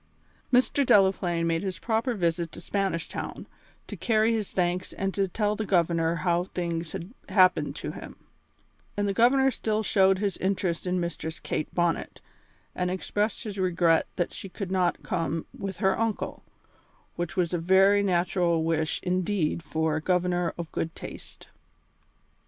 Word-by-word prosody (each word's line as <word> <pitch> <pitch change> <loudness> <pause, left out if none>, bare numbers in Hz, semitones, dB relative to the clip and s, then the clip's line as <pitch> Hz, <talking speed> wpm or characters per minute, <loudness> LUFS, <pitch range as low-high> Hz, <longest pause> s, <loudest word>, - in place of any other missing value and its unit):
Mr. 255 +3 +3
Delaplaine 190 -6 +3
made 165 0 +1
his 190 -2 -3
proper 230 +2 0
visit 170 -3 0
to - - -9
Spanish 185 -2 -1
Town, - - -6 0.4
to - - -7
carry 225 -1 +2
his 215 -3 -2
thanks 180 0 -1
and 195 0 -2
to 195 -1 +1
tell 210 +3 0
the 220 - -2
Governor 170 -4 +2
how 175 0 +2
things 170 -3 -3
had 180 +7 -6 0.2
happened 185 -2 +4
to - - -5
him; - - -9 0.8
and 205 0 +1
the 200 - 0
Governor 265 +5 +4
still 220 -3 -1
showed 195 -2 +4
his 200 0 -1
interest 185 -2 -1
in 180 0 +1
Mistress 170 -1 -4
Kate 155 - -3
Bonnet, 175 -2 0 0.5
and 180 0 -1
expressed 205 +3 -1
his 205 -3 -6
regret 170 -3 +3
that 175 - -1
she 195 - -8
had 195 -3 -4
not 180 -2 +1
come 165 -2 -2
with 195 -2 -5
her 190 0 +2
uncle, 225 -2 -2 0.7
which 175 +1 -4
was 180 -1 +1
a 175 - +1
very 190 +4 +5
natural 175 -3 +1
wish 160 -1 0
indeed 180 -2 0
for 160 0 -1
a 155 - -1
governor 180 0 +1
of 170 -2 -6
good 165 0 -3
taste. - - -10
185 Hz, 160 wpm, -27 LUFS, 170-200 Hz, 0.8 s, very